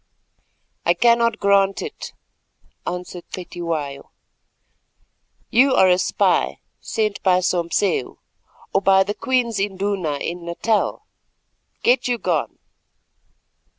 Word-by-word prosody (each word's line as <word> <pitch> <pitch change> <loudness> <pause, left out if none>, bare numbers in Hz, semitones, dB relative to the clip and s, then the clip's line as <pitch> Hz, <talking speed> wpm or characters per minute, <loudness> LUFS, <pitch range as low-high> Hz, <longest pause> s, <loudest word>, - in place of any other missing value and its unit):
"I 170 - +3
cannot 235 +2 +3
grant 195 -1 +2
it," 440 -1 -8 0.7
answered 180 0 -5
Cetywayo, 165 -6 -5 1.4
"you 260 +3 +5
are 190 - +5
a 180 0 +4
spy - - +1 0.2
sent 215 -3 -2
by 185 -2 +4
Sompseu, 175 -4 0 0.6
or 195 - +3
by 190 0 +5
the 205 +2 -3
Queen's 240 -3 0
Induna 195 -5 -1
in 170 +4 -5
Natal. 205 +6 -1 0.8
Get 250 +1 +3
you 245 -1 0
gone." - - -2
195 Hz, 100 wpm, -21 LUFS, 175-225 Hz, 1.4 s, you